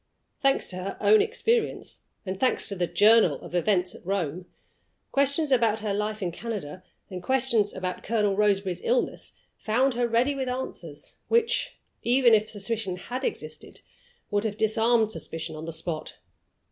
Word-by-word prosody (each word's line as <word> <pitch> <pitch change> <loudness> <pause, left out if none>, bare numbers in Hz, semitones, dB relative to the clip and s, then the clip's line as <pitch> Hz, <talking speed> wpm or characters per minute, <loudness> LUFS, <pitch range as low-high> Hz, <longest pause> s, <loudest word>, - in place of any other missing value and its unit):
Thanks 275 -1 +2
to 185 - -4
her 185 +2 -5
own 215 +1 +5
experience, 465 0 0 0.3
and 190 0 -4
thanks 260 - +1
to 200 - -4
the 175 -2 -1
"Journal" 210 -8 +5
of - - -11
events 180 0 +1
at - - -13
Rome, 180 -2 -2 0.6
questions 280 +2 +2
about 225 -4 +3
her 210 -2 -1
life 210 +1 -2
in 175 - -1
Canada 185 -5 -6 0.3
and 180 -1 -5
questions 235 -3 +2
about 185 -1 -4
Colonel 210 -2 +1
Roseberry's 195 -3 +1
illness - - -1 0.2
found 255 +5 +1
her 240 0 0
ready 235 +5 +2
with 265 -2 -3
answers 175 - -6
which 465 0 +1 0.3
(even 245 -1 +4
if 215 0 +3
suspicion 205 -2 -2
had 245 +8 -6
existed) - - -5 0.5
would 205 0 +1
have 215 -2 -3
disarmed 220 +1 +2
suspicion 165 -6 -5
on 155 +1 -7
the 165 - -5
spot. 160 -1 -5
215 Hz, 160 wpm, -26 LUFS, 185-245 Hz, 0.6 s, own